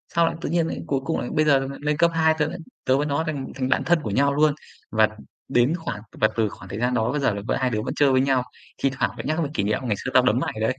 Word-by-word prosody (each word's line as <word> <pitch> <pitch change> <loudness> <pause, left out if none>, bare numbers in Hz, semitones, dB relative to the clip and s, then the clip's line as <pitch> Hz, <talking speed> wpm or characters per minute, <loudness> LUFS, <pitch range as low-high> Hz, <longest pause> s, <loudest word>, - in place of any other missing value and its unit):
Sau 170 0 +5
lại - - -1
tự - - -3
nhiên 170 -1 +1
lại - - -4
cuối 135 -1 +1
cùng 160 - -1
lại 120 - -4
bây 155 0 +3
giờ 140 -2 +5
là 135 - -3
lên 150 0 0
cấp 170 +1 +4
2 160 -1 +3
tớ 150 - +2
lại 180 - -5 0.3
tớ 130 - +3
với 145 - 0
nó 145 +1 0
thành 140 -4 -3
thành 130 -1 -2
bạn - - +2
thân 175 -1 +3
của 110 - -3
nhau 140 +6 +2
luôn. 150 0 +4 0.4
Và 110 0 +4 0.4
đến 125 +5 +3
khoảng 115 - -5 0.2
và 110 - +6
từ 110 -2 +2
khoảng 95 0 -12
thời 100 - -5
gian 125 +1 +1
đó 115 0 +1
bây 150 - -1
giờ 115 - +2
là 100 - -4
v - - -1
hai 130 -1 +1
đứa 110 -3 -1
vẫn - - -3
chơi 145 -2 +4
với 130 0 +4
nhau. 135 -2 +2 0.4
Thi 135 - +3
thoảng 110 -4 +1
lại - - -6
nhắc 155 +2 0
về 145 - -3
kỷ 100 - 0
niệm 105 +1 0
"Ngày 115 -5 0
xưa 125 - -2
tao 130 - +6
đấm 125 -1 +3
mày - - -2
đấy." 130 +4 0
135 Hz, 325 wpm, -24 LUFS, 115-150 Hz, 0.4 s, và